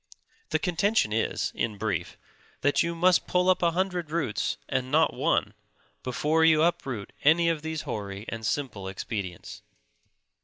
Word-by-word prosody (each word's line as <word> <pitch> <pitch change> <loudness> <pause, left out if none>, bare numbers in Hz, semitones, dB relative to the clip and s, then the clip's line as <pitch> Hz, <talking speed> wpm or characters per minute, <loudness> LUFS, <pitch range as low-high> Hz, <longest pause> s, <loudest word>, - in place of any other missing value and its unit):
The - - +2
contention 190 - +1
is, 110 - 0
in 110 -3 -2
brief, 95 -5 -3 0.4
that 145 +1 +3
you 170 0 -1
must 180 +1 +3
pull 180 +1 +3
up 185 - 0
a 170 - +4
hundred 180 -1 -1
roots, 150 -9 -1
and 130 0 -1
not 160 +3 +3
one, - - +1 0.5
before 150 +6 +1
you 160 -1 +5
uproot 135 - -1
any 170 +3 +5
of 165 -2 -1
these 160 0 -4
hoary 100 -6 -5
and 115 0 -5
simple 110 -3 -2
expedients. 95 -2 -5
150 Hz, 150 wpm, -27 LUFS, 110-170 Hz, 0.5 s, you